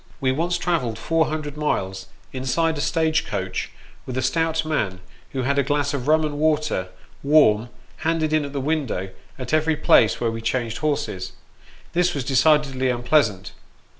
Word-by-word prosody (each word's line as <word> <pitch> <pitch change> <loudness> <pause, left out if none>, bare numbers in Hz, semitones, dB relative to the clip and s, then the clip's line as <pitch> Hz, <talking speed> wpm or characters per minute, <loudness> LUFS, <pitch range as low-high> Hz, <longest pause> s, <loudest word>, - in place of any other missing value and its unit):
We 130 -3 +1
once 170 +6 0
travelled 155 -11 -1
four 160 +7 +1
hundred 150 -2 -4
miles, 95 -11 -2 0.3
inside 135 +6 0
a 145 - -3
stage 160 +1 +1
coach, - - -3 0.4
with 130 - -4
a 130 - 0
stout 160 +4 0
man, 100 -12 -1 0.3
who 130 -2 -2
had 140 +2 +1
a - - +3
glass 145 +1 0
of 140 -2 -3
rum 155 +1 +4
and 145 -1 -4
water, 150 -10 +1 0.3
warm, 120 -7 +4 0.3
handed 160 -1 0
in 155 -1 +3
at 140 - -6
the 140 - -3
window 135 - -2 0.3
at 130 +2 -6
every 155 0 +2
place 115 -6 +4
where 115 -1 0
we 115 0 -5
changed 115 0 -2
horses. 145 -11 -2 0.6
This 175 0 +2
was 140 - -2
decidedly 135 0 +2
unpleasant. 120 -5 +1
145 Hz, 165 wpm, -23 LUFS, 120-155 Hz, 0.6 s, rum